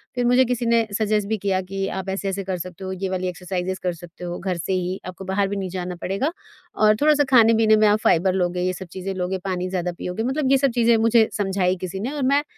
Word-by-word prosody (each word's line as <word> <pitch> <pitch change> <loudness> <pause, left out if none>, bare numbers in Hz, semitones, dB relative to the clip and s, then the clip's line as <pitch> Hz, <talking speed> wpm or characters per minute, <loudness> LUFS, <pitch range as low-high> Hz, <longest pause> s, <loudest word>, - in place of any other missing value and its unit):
फिर 245 - 0
मुझे 250 +2 +5
किसी 245 -1 -1
ने 230 -1 +3
सजेस्ट 210 -2 0
भी 220 0 0
किया 190 -1 0
कि 195 +1 -4
आप 190 0 -4
ऐसे-ऐसे 195 0 -2
कर 185 -1 -2
सकते 180 +2 -8
हो, 190 - -4
ये 190 0 -3
वाली 185 0 -2
एक्सरसाइज़ेज़ 180 +1 -3
कर 180 -1 0
सकते 175 +1 -12
हो 175 0 -4
घर 185 -1 -2
से 175 +3 -2
ही। 185 +1 -2
आपको 185 +1 -8
बाहर 195 +1 0
भी 200 - -3
नहीं 190 -1 -3
जाना 180 0 -4
पड़ेगा 200 - -1 0.4
और 215 0 +4
थोड़ा-सा 295 -1 +4
खाने-पीने 225 -2 +6
में 215 0 +4
आप 210 +1 +3
फाइबर 185 +3 +3
लोगे, 180 -1 0
ये 185 0 0
सब 185 0 -8
चीज़ें 190 +1 -4
लोगे, 185 +1 -2
पानी 185 -1 -2
ज़्यादा 180 -1 -2
पियोगे 180 +5 -4
मतलब 265 +2 0
ये 275 - +6
सब 270 -1 +2
चीज़ें 235 -1 +4
मुझे 225 0 +4
समझाई 190 -2 +1
किसी 185 +1 -4
ने 245 +7 -3
और 290 -2 -3
मैं 280 +3 +3
195 Hz, 250 wpm, -22 LUFS, 185-225 Hz, 0.4 s, खाने-पीने